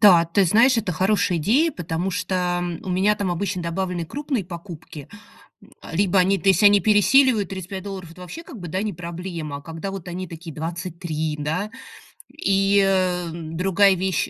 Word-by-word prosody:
Да, 180 -6 +7
ты 180 +4 +2
знаешь, 230 +8 +5
это 210 -5 -1
хорошая 185 0 +1
идея, 265 - +3
потому 175 - -3
что 180 -2 -1 0.2
у - - -8
меня 195 +4 +3
там 200 -3 -2
обычно 185 +1 -2
добавлены 175 0 -2
крупные 275 - -3
покупки, 170 -4 -9 0.9
либо 195 +1 +3
они, 195 +2 +3
то 195 - -4
есть, 190 +2 +3
они 205 0 +7
пересиливают 215 +3 +4
35 190 0 -6
долларов, 190 -4 -7
это 180 +2 -14
вообще, 180 - -8
как 255 - -11
бы, 175 - -7
да, 185 +5 -1
не 210 -3 -2
проблема, 170 -3 -6
а - - -11
когда 165 +5 -6
вот 190 -3 -7
они 180 +1 -5
такие- 165 -1 -9
23, 165 -1 -4
да, 160 +8 -2 0.6
И, 195 0 +2
а, 180 -3 +1
другая 180 +4 +2
вещь, 185 0 -1
185 Hz, 170 wpm, -23 LUFS, 170-200 Hz, 0.9 s, Да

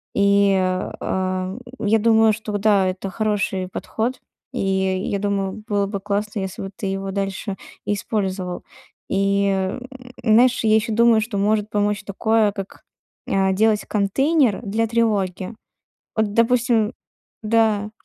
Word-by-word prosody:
И, 200 0 +4
а, 185 0 -1
м, 210 +6 -7 0.3
я 220 +2 +4
думаю, 225 0 +5
что 210 -1 -3
да, 200 -2 +3
это 185 +1 -3
хороший 200 -3 -1
подход. 225 +6 -3 0.3
И 250 - -3
я 190 0 0
думаю, 200 0 -2
было 205 -1 +1
бы 200 -1 -4
классно, 210 +1 -2
если 190 -2 -5
бы 195 - -5
ты 200 - -7
его 195 0 -2
дальше 195 0 -3 0.3
использовал. 190 -3 -2 0.5
И, 200 +1 +2
м, 190 +4 -1 0.4
знаешь, 240 +3 +4
я 215 -1 +4
ещё 220 0 +1
думаю, 230 0 +5
что 220 -2 -3
может 210 +1 +1
помочь 205 0 0
такое, 215 +1 +1
как, 195 -1 -8 0.4
а, 190 0 +2
делать 210 +2 +2
контейнер 245 - +2
для 225 +2 0
тревоги. 210 -4 0 0.6
Вот, 215 -2 0
допустим 230 -1 +2 0.5
да, 215 -2 +2
205 Hz, 135 wpm, -21 LUFS, 195-220 Hz, 0.6 s, думаю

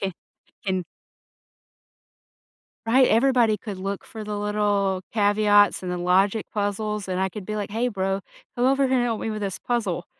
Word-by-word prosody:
can 195 -1 -2 0.5
can. 185 -2 -1 2.0
Right, 255 +3 +5
everybody 235 -2 +3
could 205 -4 -6
look 195 +1 -4
for 220 -1 -8
the 210 0 -4
little 205 -2 0
caveats 205 -2 +4
and 180 -1 -3
the 180 - -3
logic 195 +4 +2
puzzles, 210 0 -2
and 185 0 -1
I 190 - +1
could 195 +2 -8
be 215 - -4
like, 205 -1 -4
"Hey 230 +4 0
bro, 195 -3 -1 0.4
come 245 - +1
over 275 +1 +3
here 260 0 +2
and 245 - +2
help 230 -3 -1
me 225 - -2
with 215 -1 -4
this 195 -2 -3
puzzle. 205 -8 -2
205 Hz, 175 wpm, -24 LUFS, 195-225 Hz, 2.0 s, Right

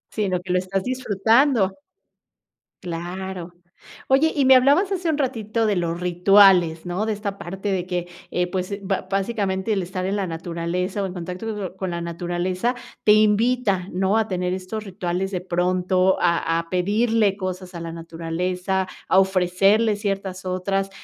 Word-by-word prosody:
Sino 190 -4 0
que 180 -1 -2
lo 180 - +3
estás 190 +1 -2
disfrutando. 230 -2 +2 1.1
Claro. 175 +1 -5 0.5
Oye, 280 +4 +4
y 280 -3 +2
me 265 - +8
hablabas 285 +10 +4
hace 365 -4 -1
un 305 - +1
ratito 230 -5 -1
de 210 - +2
los 170 -1 -1
rituales, 180 -2 +5
¿no? 180 +4 -2
De 220 - -1
esta 200 -1 -4
parte 195 +3 -5
de 180 -1 -1
que, 175 -1 -3 0.2
eh, 180 0 0
pues, 190 +2 -3
ba 190 -1 -2
básicamente, 195 0 -1
el 195 - 0
estar 185 +1 -4
en 195 +2 -1
la 200 - -1
naturaleza 170 +3 -3
o - - 0
en 185 - -5
contacto 185 +2 -5
con 190 -1 -4
la 170 - -3
naturaleza 175 +6 -2 0.3
te 210 - +5
invita, 215 -2 +3
¿no? 190 +4 +1
A 220 -1 0
tener 180 -1 -1
estos 190 +4 -5
rituales 185 0 -3
de 180 - -2
pronto, 185 +1 +1
a 170 -1 +2
a 165 - -7
pedirle 205 +3 +2
cosas 185 -1 -5
a 170 - -5
la 165 - -5
naturaleza, 180 +3 -3 0.2
a 190 - +6
ofrecerle 195 +3 +3
ciertas 195 -2 -3
otras. 195 +1 -1
190 Hz, 165 wpm, -23 LUFS, 180-210 Hz, 1.1 s, me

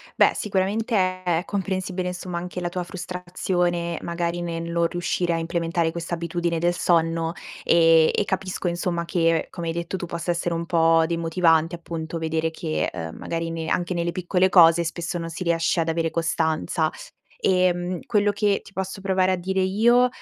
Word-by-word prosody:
Beh, - - +5
sicuramente 210 +3 -1 0.3
è 175 -1 +1
comprensibile, 190 -2 -2
insomma, 180 -1 -4
anche 180 +1 -6
la 175 -1 -2
tua 180 +1 -3
frustrazione, 175 -1 -2
magari 170 0 -2
nel 165 -1 -3
non 170 0 +2
riuscire 175 0 -1
a - - 0
implementare 165 0 -1
questa 170 0 -4
abitudine 170 0 -2
del 175 +2 +1
sonno, 165 -1 +1 0.3
e 165 -1 +5
e - - +2
capisco 190 -2 -2
insomma 170 0 -1
che, 165 -2 +1
come 170 -2 -5
hai 165 - -1
detto 170 +2 -3
tu, 175 - -5
possa 170 +1 -2
essere 170 0 -1
un 165 0 -3
po' 165 -1 +4
demotivante, 165 0 +2
appunto, 165 -1 -5
vedere 160 0 -1
che, 80 - -2
uhm, 80 -2 -6
magari 165 0 -3
ne 165 -1 -4
anche 175 +3 0
nelle 170 0 -1
piccole 185 +1 +1
cose 170 -2 +6
spesso 170 +1 -3
non 165 0 -4
si 175 - -5
riesce 170 0 +1
ad 165 - -1
avere 165 0 0
costanza. 160 -1 0 0.5
Ehm, 180 -1 +1
quello 205 -1 +2
che 205 -1 +1
ti - - -16
posso 190 0 -4
provare 190 -1 +2
a - - +1
dire 190 +2 -1
io, 235 +6 +4
170 Hz, 175 wpm, -24 LUFS, 165-185 Hz, 0.5 s, cose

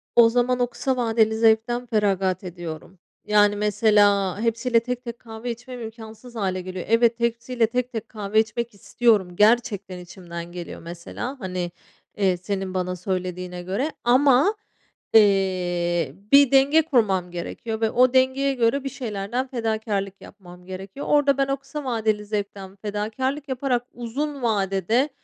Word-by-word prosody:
O 235 -1 +7
zaman 250 +1 +1
o 245 - +2
kısa 260 +1 -2
vadeli 225 -2 +2
zevkten 230 +2 +2
feragat 195 -5 0
ediyorum. 175 0 -8 0.3
Yani, 205 -1 +4
mesela 205 -2 +3
hepsiyle 230 +1 +2
tek 250 +1 -5
tek 235 -1 -7
kahve 225 +1 -6
içmem 245 +1 -8
imkânsız 225 +1 -10
hâle 185 -3 -1
geliyor 185 0 -6
Evet 230 +1 +3
hepsiyle 235 0 0
tek 250 +1 -2
tek 225 -4 -5
kahve 210 0 0
içmek 225 +1 -1
istiyorum 200 -3 +1
gerçekten 205 -4 +2
içimden 175 -1 -9
geliyor 175 -1 -8
mesela, 175 +10 -6
hani, 180 -3 -3 0.5
eee, 190 -3 +2
senin 190 0 -4
bana 180 0 -2
söylediğine 180 -1 -4
göre 200 - -2
ama, 270 - +4 0.6
eee, 180 -7 +2 0.2
bir 280 -2 +7
denge 280 +4 +5
kurmam 205 - +1
gerekiyor 220 +6 -5
ve 220 - +2
o 250 +1 +4
dengeye 260 +1 +3
göre 250 +2 +1
bir 275 - -3
şeylerden 235 0 -3
fedakârlık 220 -5 -2
yapmam 180 -3 -14
gerekiyor. 190 +7 -7
Orada 285 -2 +4
ben 275 - +2
o 275 0 0
kısa 275 +2 -7
vadeli 220 -3 0
zevkten 200 -2 -5
fedakârlık 220 +8 -3
yaparak 255 -2 0
uzun 275 +5 -4
vadede 215 - +1
220 Hz, 145 wpm, -24 LUFS, 190-245 Hz, 0.6 s, O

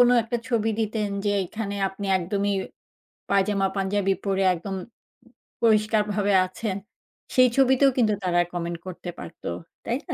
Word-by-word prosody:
কোনো 245 0 +7
একটা 235 +2 -2
ছবি 225 -2 +1
দিতেন 215 -1 -1 0.2
যে 205 - +2
এখানে 205 0 -4
আপনি 195 +1 -6
একদমই 200 +3 -1 0.8
পায়জামা-পাঞ্জাবি 195 0 +1
পড়ে 195 0 +1
একদম 190 +3 -5 0.9
পরিষ্কারভাবে 210 -2 +3
আছেন। 190 +1 -4 0.6
সেই 255 -1 +7
ছবিতেও 270 +1 +5
কিন্তু 220 -4 +3
তারা 175 -1 +3
comment 170 -1 -3
করতে 175 0 -6
পারত, 85 - -10 0.4
তাই - - 0
না? - - -3
205 Hz, 130 wpm, -25 LUFS, 190-220 Hz, 0.9 s, কোনো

